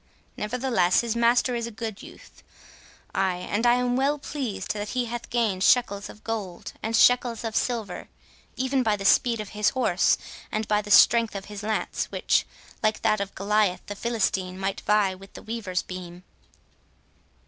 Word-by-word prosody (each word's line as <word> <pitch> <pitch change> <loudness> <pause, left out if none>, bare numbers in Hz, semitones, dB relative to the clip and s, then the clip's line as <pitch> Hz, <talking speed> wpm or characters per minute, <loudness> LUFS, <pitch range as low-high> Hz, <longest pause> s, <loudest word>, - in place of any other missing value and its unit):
Nevertheless 220 -5 +1
his 235 -1 -2
master 235 +2 +3
is 235 -1 -2
a 225 -2 -11
good 220 -3 -5
youth—ay, 190 -1 -7
and 205 +6 -1
I 240 - +6
am 245 0 0
well 275 +3 +1
pleased 275 -7 -4
that 205 0 -5
he 245 - +1
hath 240 0 -6
gained 220 -6 0
shekels 205 -5 +3
of 215 - -13
gold 210 -6 -5
and 225 +1 -1
shekels 245 0 +4
of 225 -1 -4
silver, 235 -5 -2 0.5
even 260 +1 0
by 220 -4 +2
the 200 -1 -6
speed 235 +2 +4
of 210 -2 -5
his 210 0 +1
horse 220 -9 +2 0.3
and 215 0 -2
by 210 0 +2
the 205 - -10
strength 230 +1 +6
of 195 0 -5
his 205 -1 -8
lance, 215 +1 -2
which, - - 0 0.3
like 215 0 0
that 215 -2 +2
of 200 0 -5
Goliath 200 -2 +1
the 205 - -6
Philistine, 195 -5 -1
might 195 0 -2
vie 210 -2 +2
with 195 +1 -13
a - - -9
weaver's 215 -5 -3
beam." 180 -1 -9
215 Hz, 170 wpm, -25 LUFS, 195-235 Hz, 0.5 s, I